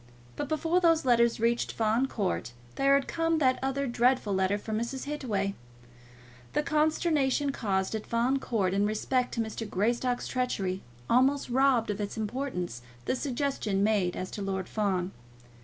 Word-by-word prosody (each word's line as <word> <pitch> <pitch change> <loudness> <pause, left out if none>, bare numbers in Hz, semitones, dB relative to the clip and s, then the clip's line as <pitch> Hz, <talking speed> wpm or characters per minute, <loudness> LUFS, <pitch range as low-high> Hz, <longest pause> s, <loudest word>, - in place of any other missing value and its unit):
But 285 - -4
before 325 +3 +1
those 330 -4 +4
letters 235 -2 +3
reached 235 +1 +1
Fawn 225 +4 +1
Court 90 - -2 0.2
there 275 0 +4
had 275 - +1
come 330 0 +1
that 260 -4 +3
other 270 +1 -1
dreadful 245 -3 +2
letter 190 +1 +1
from 215 +1 -3
Mrs. 245 +3 -4
Hittaway. 220 -10 -2 1.0
The 300 - +1
consternation 300 -2 +1
caused 195 -7 -1
at 220 -1 -4
Fawn 245 +4 +1
Court 200 -8 0
in 200 +1 +2
respect 250 +4 0
to 230 - 0
Mr. 220 0 -4
Greystock's 240 +6 0
treachery 195 -8 -1 0.3
almost 260 +2 +3
robbed 255 -4 +3
of 205 +1 -4
its 205 +2 -4
importance 215 - -3 0.2
the - - 0
suggestion 255 -7 -1
made 205 -4 +2
as 185 - -5
to 205 - -5
Lord 190 -2 -2
Fawn. 195 -4 -1
235 Hz, 155 wpm, -29 LUFS, 205-270 Hz, 1.0 s, those